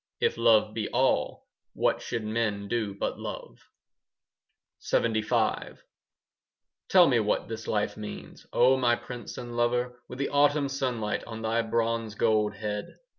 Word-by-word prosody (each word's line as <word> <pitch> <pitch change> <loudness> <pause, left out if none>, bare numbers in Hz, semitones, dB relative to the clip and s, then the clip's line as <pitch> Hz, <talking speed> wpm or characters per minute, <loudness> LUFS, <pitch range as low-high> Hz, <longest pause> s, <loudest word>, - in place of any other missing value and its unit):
If - - +1
love 110 -2 +4
be 110 -2 -3
all, 130 +2 +1 0.3
What - - +1
should 115 -2 -3
men 105 -2 -1
do 105 -3 -2
but - - -3
love? - - -7 1.2
LXXV 110 0 0 1.1
Tell 180 -2 +7
me 125 -3 +3
what 105 -1 0
this 110 0 -6
life 105 -1 0
means, 105 -1 -9
O 130 +2 +5
my 120 -2 +3
prince 120 -2 -8
and 120 -1 -7
lover, 125 +1 0
With 125 - -7
the 140 - -1
autumn 145 0 +3
sunlight 125 -6 -2
On 110 -1 -7
thy 115 +1 +1
bronze 115 -1 -1
gold 105 -2 +2
head? 105 0 -4
115 Hz, 140 wpm, -28 LUFS, 110-125 Hz, 1.2 s, Tell